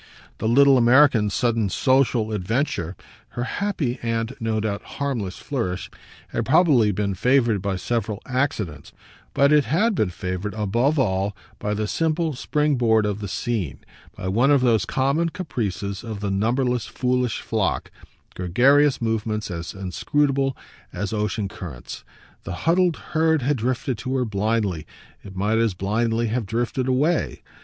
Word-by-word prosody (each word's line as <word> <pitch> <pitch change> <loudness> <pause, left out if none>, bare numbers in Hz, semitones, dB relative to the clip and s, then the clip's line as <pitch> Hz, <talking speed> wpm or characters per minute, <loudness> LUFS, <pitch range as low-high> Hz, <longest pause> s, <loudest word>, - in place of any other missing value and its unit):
The - - -1
little 135 +2 +6
American's 120 -4 +5
sudden 115 -4 +1
social 125 0 +2
adventure, 100 - -1 0.4
her 120 - 0
happy 145 - -2
and, 115 +2 -2
no 110 -1 -1
doubt, 105 -2 -2 0.2
harmless 120 -10 -2
flourish, 115 -11 -3 0.4
had - - -2
probably 140 - +4
been 100 0 -1
favoured 115 0 +2
by 100 -1 -1
several 105 +1 -2
accidents, 110 - -2 0.4
but 140 +1 +4
it 150 -2 +4
had 215 +9 +2
been 110 - +1
favoured 95 +3 -4
above 115 +8 +1
all 100 -5 0 0.2
by 105 0 -2
the 105 +1 -1
simple 160 +6 0
spring 150 +2 0
board 110 -3 +3
of 105 0 -2
the 100 - -5
scene, 95 - -2 0.4
by 95 - -5
one 115 +9 +3
of 140 -2 +5
those 115 -4 +3
common 145 +5 +1
caprices 105 - -4
of 110 -3 -6
the 100 -1 -2
numberless 120 +4 0
foolish 125 +1 0
flock, - - -1 0.4
gregarious 130 +9 +3
movements 110 -2 -1
as 85 +1 -5
inscrutable 135 +8 0 0.3
as 105 +1 -4
ocean 105 -1 -1
currents. 80 -10 -8 0.4
The - - -5
huddled 175 -1 +3 0.2
herd 160 -3 +2
had 145 +2 +1
drifted 125 0 -2
to 130 +3 -3
her 130 -1 +1
blindly 105 -5 -1 0.4
it 95 -1 -11
might 105 +4 +1
as 115 -5 +1
blindly 115 +5 0
have 115 -2 -2
drifted 120 +4 -1
away. 145 +6 0
115 Hz, 150 wpm, -23 LUFS, 105-135 Hz, 0.4 s, little